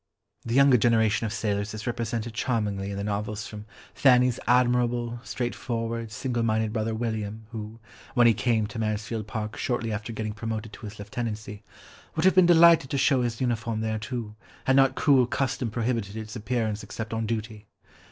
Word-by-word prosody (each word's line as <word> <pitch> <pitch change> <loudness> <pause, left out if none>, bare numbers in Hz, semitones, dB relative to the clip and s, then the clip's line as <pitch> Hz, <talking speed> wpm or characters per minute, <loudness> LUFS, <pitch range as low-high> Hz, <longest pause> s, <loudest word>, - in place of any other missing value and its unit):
The 115 - -2
younger 140 -2 +6
generation 115 -1 +2
of - - -5
sailors 105 -1 -2
is 110 - -7
represented 115 -1 -3
charmingly 105 -5 -1
in 100 - -4
the 100 - -3
novels 105 +1 -3
from 105 0 -9 0.3
Fanny's 125 -2 +4
admirable, 120 -1 +2
straightforward, 115 -2 -3
single 120 +1 -2
minded 110 -1 +1
brother 110 0 -1
William, 110 -1 -3
who, 110 0 -7 0.4
when 120 -1 +5
he 115 - +7
came 115 -3 +1
to 115 +2 -6
Mansfield 110 0 -2
Park 110 -1 -4
shortly 120 -2 -1
after 105 +1 -4
getting 110 -1 -4
promoted 110 0 -5
to 110 - -8
his 105 +2 -10
lieutenancy, 105 -1 -5 0.5
"would 160 +2 0
have 190 - +6
been 185 -2 +6
delighted 170 -5 +6
to 140 - -1
show 135 -1 +3
his 120 -2 -2
uniform 115 -3 -1
there 110 0 -1
too, 115 -2 -5 0.3
had 130 - +3
not 135 -1 +5
cruel 135 -5 +4
custom 130 -2 -1
prohibited 115 -2 -2
its 110 0 -7
appearance 110 -2 -2
except 110 0 -6
on 110 0 -1
duty. 110 -1 -4
115 Hz, 175 wpm, -26 LUFS, 110-120 Hz, 0.5 s, he